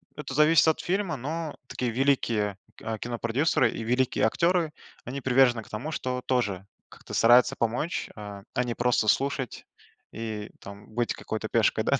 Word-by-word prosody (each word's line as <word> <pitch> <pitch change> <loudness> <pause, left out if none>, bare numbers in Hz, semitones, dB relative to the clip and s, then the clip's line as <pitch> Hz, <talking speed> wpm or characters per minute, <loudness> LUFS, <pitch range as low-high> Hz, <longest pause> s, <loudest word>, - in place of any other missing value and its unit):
это 145 -2 -6
зависит 150 +2 +5
от 160 - +3
фильма, 185 -3 -1
но 155 +4 -4
такие 125 -2 -2
великие 115 -6 +1 0.2
к 110 0 -5
кинопродюсеры 120 +3 +1
и 115 - -5
великие 125 +3 +1
актеры, 170 +6 +2 0.3
они 135 +3 -5
привержены 125 -2 +4
к - - -18
тому, 125 +9 -5
что 125 -4 -3
тоже 105 -7 0 0.2
как-то - - -12
стараются 120 +2 +5
помочь, 120 +9 -1
а, 105 -2 -8
а 125 - +2
не 120 -1 -2
просто 120 -2 +1
слушать 135 +1 0 0.5
и 110 -2 -5
там 100 +1 -11
быть 120 +1 0
какой-то 110 0 -5
пешкой, 110 -1 +2
да, - - +1
125 Hz, 160 wpm, -27 LUFS, 110-140 Hz, 0.5 s, зависит